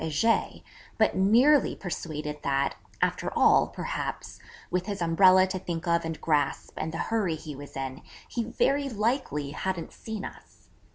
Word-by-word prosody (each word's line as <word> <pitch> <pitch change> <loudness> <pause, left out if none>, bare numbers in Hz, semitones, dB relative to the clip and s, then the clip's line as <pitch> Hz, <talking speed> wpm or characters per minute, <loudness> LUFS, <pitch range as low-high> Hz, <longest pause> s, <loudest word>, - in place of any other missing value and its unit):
Heger, 160 +9 +1 0.4
but - - +3
nearly 245 +10 +4
persuaded 150 -5 -5
that, 140 0 +1 0.3
after - - 0
all, - - +5
perhaps, - - -5 0.3
with 180 +1 -1
his 200 -1 -3
umbrella 185 +2 +6
to 190 0 -3
think 170 -1 -4
of 170 0 +2
and 165 -1 -4
grasp, 145 -3 0
and 160 - -3
the 165 - -5
hurry 205 -7 0
he 155 -2 -8
was 145 +1 -10
in, 135 0 -5 0.3
he 235 - -2
very 275 +4 +1
likely 215 - -1
hadn't 180 +3 -4
seen 220 -3 -6
us. - - -13
175 Hz, 155 wpm, -28 LUFS, 150-215 Hz, 0.4 s, umbrella